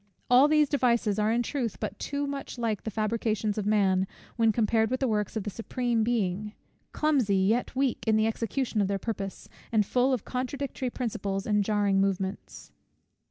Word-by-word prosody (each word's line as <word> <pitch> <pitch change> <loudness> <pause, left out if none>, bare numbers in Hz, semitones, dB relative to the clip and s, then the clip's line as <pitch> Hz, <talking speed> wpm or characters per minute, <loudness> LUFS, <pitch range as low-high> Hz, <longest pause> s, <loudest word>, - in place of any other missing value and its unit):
All 255 +4 +7
these 305 -1 +4
devices 235 -7 +1
are 210 +1 +2
in 240 +1 +1
truth 245 -5 -3
but - - -4
too 285 0 -2
much 280 -2 -5
like 225 -4 -1
the - - -4
fabrications 215 0 -1
of 205 - -2
man, 190 -3 +3 0.3
when 225 -2 +3
compared 220 0 +2
with 255 +1 -1
the 265 - +1
works 210 -2 -1
of 220 - -2
the 205 - -4
Supreme 235 +1 -1
Being; 210 -3 -1 0.4
clumsy, 265 -10 +2
yet 220 +8 +1
weak 265 -1 0
in 220 - +4
the 215 0 +3
execution 230 +1 -1
of 195 - +1
their 200 0 0
purpose, 195 -2 -5 0.2
and 215 -3 +3
full 250 +5 +2
of 250 -6 -1
contradictory 260 0 -3
principles 205 -6 -3
and 210 -1 +2
jarring 200 -2 +2
movements. 195 0 -3
220 Hz, 180 wpm, -28 LUFS, 205-250 Hz, 0.4 s, All